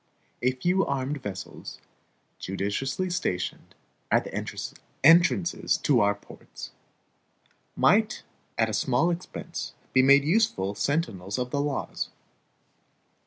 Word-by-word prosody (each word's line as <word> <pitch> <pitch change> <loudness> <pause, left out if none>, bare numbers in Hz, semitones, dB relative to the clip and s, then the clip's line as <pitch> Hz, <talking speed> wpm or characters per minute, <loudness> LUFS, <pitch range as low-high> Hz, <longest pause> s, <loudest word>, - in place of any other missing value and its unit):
A 125 +1 +2
few 180 +9 +1
armed 140 +1 -2
vessels, 95 -5 -7 0.6
judiciously 130 - -2
stationed 90 - -3 0.3
at - - +3
the - - -9
entrances 175 +3 +2
of 140 -5 +5
our 100 -1 +3
ports, 100 - -11 1.0
might - - +3 0.3
at 115 - +3
a 110 - -4
small 130 +10 +2
expense 175 +1 -6 0.2
be 130 - +6
made 140 +1 +6
useful 155 - +1
sentinels 105 - -1
of 125 0 -3
the 145 - 0
laws. 145 -1 -3
135 Hz, 110 wpm, -27 LUFS, 105-165 Hz, 1.0 s, be